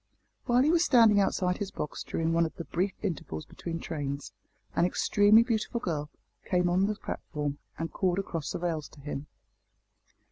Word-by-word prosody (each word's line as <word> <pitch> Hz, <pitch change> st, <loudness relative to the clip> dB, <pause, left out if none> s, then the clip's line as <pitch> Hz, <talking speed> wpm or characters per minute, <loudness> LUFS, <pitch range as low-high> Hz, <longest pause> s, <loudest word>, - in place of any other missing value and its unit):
While 245 Hz, +1 st, +4 dB
he 305 Hz, -, +4 dB
was 340 Hz, 0 st, +4 dB
standing 225 Hz, -8 st, +6 dB
outside 185 Hz, -2 st, +1 dB
his 205 Hz, -2 st, -2 dB
box 150 Hz, -, -5 dB
during 165 Hz, 0 st, -1 dB
one 165 Hz, 0 st, +3 dB
of 160 Hz, -, -12 dB
the 170 Hz, -, -5 dB
brief 185 Hz, +4 st, -1 dB
intervals 150 Hz, -, -3 dB
between 165 Hz, -1 st, -6 dB
trains, 145 Hz, -4 st, -4 dB, 0.4 s
an -, -, +3 dB
extremely 205 Hz, +4 st, +5 dB
beautiful 230 Hz, 0 st, -1 dB
girl 150 Hz, -7 st, -2 dB, 0.3 s
came 180 Hz, -1 st, +1 dB
on 190 Hz, +3 st, +3 dB
the 210 Hz, -, -1 dB
platform 145 Hz, -7 st, -4 dB, 0.2 s
and 165 Hz, -1 st, -4 dB
called 185 Hz, -2 st, +1 dB
across 165 Hz, -6 st, -3 dB
the -, -, -2 dB
rails 165 Hz, -3 st, -2 dB
to -, -, -17 dB
him. 145 Hz, 0 st, -5 dB
175 Hz, 175 wpm, -29 LUFS, 155-205 Hz, 0.4 s, standing